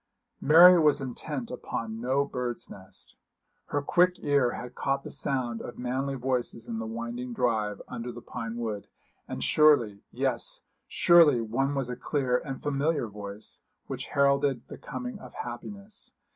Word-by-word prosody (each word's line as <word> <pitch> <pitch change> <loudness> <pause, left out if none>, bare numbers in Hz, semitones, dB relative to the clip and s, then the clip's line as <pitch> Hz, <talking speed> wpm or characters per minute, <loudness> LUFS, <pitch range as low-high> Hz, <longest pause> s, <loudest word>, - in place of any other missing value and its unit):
Mary 175 +4 +9
was 150 -2 +4
intent 130 0 -5
upon 115 -2 -4
no 135 +3 +1
bird's 125 -3 -4
nest. 95 -1 -11 0.5
Her 145 0 -1
quick 180 +4 +4
ear 140 -4 +3
had 125 0 -7
caught 135 +1 -1
the - - -7
sound 125 -4 -1
of 120 - -8
manly 130 +3 -2
voices 125 -2 -2
in 115 -1 -3
the 110 - -4
winding 120 +2 -5
drive 110 -4 0
under 125 0 -5
the 120 - -9
pine 115 -1 -6
wood; 110 -4 -4 0.4
and - - -4
surely, 120 -10 +4
yes, - - -1 0.3
surely 165 -7 +6
one 130 +5 0
was 135 -3 -1
a 125 - -4
clear 125 -1 0
and 135 -2 -7
familiar 145 0 0
voice, 105 0 -8 0.2
which - - -5
heralded 140 -3 +2
the - - -8
coming 250 -4 -6
of - - -12
happiness. 200 - -7
125 Hz, 155 wpm, -28 LUFS, 115-145 Hz, 0.5 s, Mary